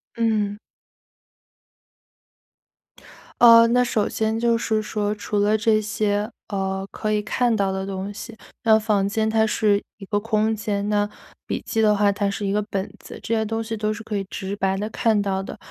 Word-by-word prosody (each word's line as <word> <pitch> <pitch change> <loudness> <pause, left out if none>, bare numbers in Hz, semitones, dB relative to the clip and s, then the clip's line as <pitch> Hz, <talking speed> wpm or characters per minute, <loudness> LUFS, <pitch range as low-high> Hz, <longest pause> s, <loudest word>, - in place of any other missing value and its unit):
嗯。 215 -3 0 2.8
呃， 230 -1 +9
那 250 +2 +3
首 220 -4 0
先 220 0 -1
就 235 0 +2
是 220 -1 0
说 210 -1 -2
除 210 0 -4
了 210 +2 +3
这 215 0 +2
些， 210 0 -1 0.2
呃， 195 -1 -2
可 215 -1 -3
以 210 0 +1
看 240 +3 +1
到 195 -2 +1
的 190 0 -3
东 195 +1 -5
西， 225 +2 -9 0.3
那 220 -1 +6
房 210 -3 +1
间 220 +1 0
它 220 0 +3
是 210 -1 +1
一 195 - -10
个 205 +1 0
空 220 0 0
间， 205 -1 -2
那 205 0 +1 0.4
笔 - - -2
记 225 - 0
的 210 -1 +4
话 205 0 +3
它 200 0 -1
是 200 +1 -3
一 195 - 0
个 210 +1 +1
本 195 0 -2
子， - - -11
这 230 - -3
些 220 - +1
东 225 +1 -2
西 225 0 -4
都 215 0 -1
是 225 +1 -8
可 215 -1 -5
以 195 - -3
直 195 +1 -4
白 195 -1 0
地 210 +2 -3
看 220 -1 +1
到 195 -1 -1
的。 195 - -8
210 Hz, 205 characters per minute, -23 LUFS, 200-220 Hz, 2.8 s, 呃